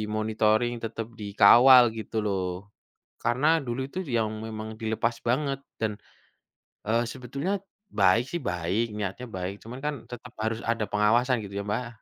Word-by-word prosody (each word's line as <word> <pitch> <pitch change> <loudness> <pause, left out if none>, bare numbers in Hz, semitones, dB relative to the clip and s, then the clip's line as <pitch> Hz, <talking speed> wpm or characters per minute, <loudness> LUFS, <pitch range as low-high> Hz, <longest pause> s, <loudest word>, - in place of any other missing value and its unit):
monitoring, 110 +2 +2
tetep 115 0 -4
dikawal, 120 +5 +7
gitu 110 +1 -7
loh. 100 -2 0 0.8
Karena 125 +5 +1 0.2
dulu 120 +2 -3
itu 185 - -5 0.2
yang 110 -1 +1 0.2
memang 110 -1 -6
dilepas 110 +1 0
banget, 135 +2 0 0.2
dan, 110 - +1 1.0
eee, 115 +2 +2
sebetulnya 140 +9 -4 0.5
baik 100 +5 +5
sih 175 - -2
baik, 90 +6 0
niatnya 105 +4 -4
baik, 90 +2 -4
cuman 120 +3 -8
kan 150 0 -1 0.2
tetap 120 +1 -9
harus 110 0 0
ada 110 -2 -1
pengawasan, 120 +5 +3
gitu 100 0 -5
ya, - - -8
Mbak. 120 +4 -1
115 Hz, 145 wpm, -27 LUFS, 105-125 Hz, 1.0 s, dikawal